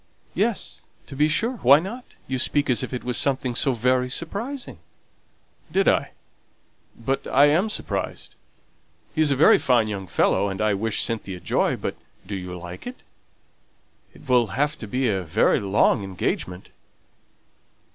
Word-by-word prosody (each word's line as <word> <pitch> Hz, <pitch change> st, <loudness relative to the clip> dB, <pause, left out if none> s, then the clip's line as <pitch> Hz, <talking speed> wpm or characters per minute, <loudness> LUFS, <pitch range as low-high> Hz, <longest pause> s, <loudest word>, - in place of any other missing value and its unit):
"Yes, -, -, -1 dB, 0.2 s
to 135 Hz, -, -10 dB
be 150 Hz, +3 st, +3 dB
sure. 230 Hz, +11 st, 0 dB
Why 140 Hz, -, +6 dB
not? 220 Hz, +9 st, -6 dB, 0.2 s
you 130 Hz, -1 st, -2 dB
speak 145 Hz, +1 st, +1 dB
as 120 Hz, -, +2 dB
if -, -, -5 dB
it 125 Hz, -, -4 dB
was 125 Hz, 0 st, -2 dB
something 130 Hz, -3 st, 0 dB
so 135 Hz, +2 st, +1 dB
very 125 Hz, +2 st, +1 dB
surprising." 200 Hz, -, -4 dB, 0.9 s
"Did -, -, +2 dB
I? -, -, +2 dB, 0.8 s
But 135 Hz, +4 st, -2 dB
I 140 Hz, +2 st, +5 dB
am 180 Hz, +9 st, +2 dB
surprised. 215 Hz, -, -3 dB, 0.8 s
He's 155 Hz, -2 st, +2 dB
a 140 Hz, -, +2 dB
very 140 Hz, -, +6 dB
fine 120 Hz, -4 st, +3 dB
young 100 Hz, -3 st, -5 dB
fellow, 100 Hz, -, +2 dB
and 95 Hz, -, -5 dB
I 105 Hz, -1 st, +2 dB
wish 105 Hz, +2 st, 0 dB
Cynthia 100 Hz, -5 st, -3 dB
joy; 85 Hz, -, 0 dB
but -, -, -4 dB, 0.3 s
do 100 Hz, +2 st, -5 dB
you 90 Hz, -1 st, -6 dB
like 90 Hz, -, -9 dB
it? 250 Hz, -, -9 dB, 1.1 s
It -, -, -16 dB
will 125 Hz, -3 st, +4 dB
have 145 Hz, +2 st, +1 dB
to 110 Hz, -, -7 dB
be 130 Hz, +5 st, 0 dB
a 95 Hz, -4 st, 0 dB
very 80 Hz, -3 st, +2 dB
long 100 Hz, 0 st, +2 dB
engagement." 95 Hz, -1 st, -3 dB
125 Hz, 155 wpm, -24 LUFS, 100-145 Hz, 1.1 s, Why